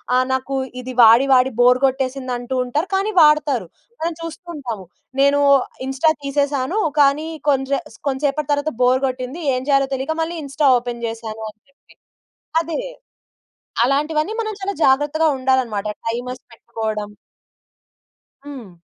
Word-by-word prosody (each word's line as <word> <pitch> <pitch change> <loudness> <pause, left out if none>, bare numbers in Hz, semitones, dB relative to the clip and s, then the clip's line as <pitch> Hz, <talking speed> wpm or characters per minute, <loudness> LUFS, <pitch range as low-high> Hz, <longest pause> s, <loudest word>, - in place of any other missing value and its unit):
ఆ - - +5
నాకు 260 +1 -2 0.3
ఇది 255 0 -6
వాడి 230 +3 +7
వాడి 255 0 +5
బోర్ 250 +1 +5
కొట్టేసిందంటూ 260 -1 -1
ఉంటారు. 295 +8 -2
కానీ 395 +3 +1
వాడుతారు. 300 -4 +4 0.3
మనం 330 +1 -2
చూస్తూ 330 +2 -8
ఉంటాము. 230 -9 -6 0.3
నేను 280 +1 +4 0.4
ఇన్‌స్టా 270 +4 +2
తీసేసాను. 280 +5 0 0.2
కానీ 285 +2 +3 0.2
కొంసే 270 0 +1 0.3
కొంసేసేపటి 285 +2 -1
తర్వాత 290 0 0
బోర్ 255 +1 +4
కొట్టింది. 255 +5 -4
ఏం 255 - -2
జేయాలో 275 -1 +3
తెలియక 270 +4 -2
మళ్ళీ 335 +1 -3
ఇన్‌స్టా 280 +1 0
ఓపెన్ 240 -1 -6
చేశాను, 225 -1 -6
అని 215 - -43
చెప్పి. 275 - -28 0.7
అదే. 330 +6 -4 1.1
అలాంటివన్నీ 305 +8 0
మనం 435 -1 -4
చాలా 395 +1 -3
జాగ్రత్తగా 295 +4 +3
ఉండాలన్నమాట. 255 -6 0 0.2
టైమర్స్ 245 +2 -4
పెట్టుకోవడం. 215 -2 -5 1.4
హ్మ్. 250 -10 -9
270 Hz, 125 wpm, -20 LUFS, 250-300 Hz, 1.4 s, వాడి